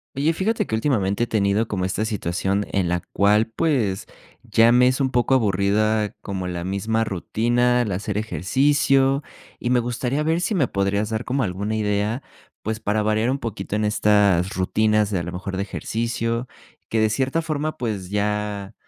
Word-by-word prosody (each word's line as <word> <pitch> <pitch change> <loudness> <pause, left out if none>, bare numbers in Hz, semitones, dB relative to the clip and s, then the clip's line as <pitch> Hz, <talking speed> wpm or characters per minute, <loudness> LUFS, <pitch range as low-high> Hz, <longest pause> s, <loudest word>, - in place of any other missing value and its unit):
Oye, 150 +4 +1
fíjate 215 +7 0
que - - -7
últimamente 110 -3 +1
he - - -15
tenido 105 +1 +1
como 95 -3 -2
esta 95 +3 -1
situación 100 -1 -1
en 95 -3 0
la 90 0 -1
cual, 105 +2 +4
pues, 120 - 0 0.3
ya 115 +1 +4
me 125 +1 +5
es 130 +2 +1
un 130 -1 +1
poco 125 +2 +2
aburrida, 105 0 +1
como 95 -2 -4
la 90 -1 -4
misma 105 +4 0
rutina 120 +5 +1
al 110 -4 -2
hacer 100 +2 -3
ejercicio. 135 - +2 0.4
Y 120 - -2
me 125 0 +4
gustaría 125 +4 -1
ver 165 +2 +1
si 205 +4 0
me 145 -9 +2
podrías 100 +1 0
dar 110 +2 -2
como 135 +1 0
alguna 100 +3 -2
idea, 105 +3 -1 0.4
pues, 110 +1 -2
para 105 0 0
variar 110 +2 +1
un 135 - +1
poquito 105 -6 -5
en 105 0 0
estas 105 -4 +3
rutinas 105 +2 +1
de 95 - 0
a - - -4
lo 85 - -5
mejor 95 +2 -5
de - - -1
ejercicio, 115 +3 -2 0.4
que 110 - 0
de 110 0 +3
cierta 135 +7 0
forma, 155 -1 -2
pues 105 -7 -3
ya 105 -1 -2
110 Hz, 180 wpm, -22 LUFS, 100-125 Hz, 0.4 s, me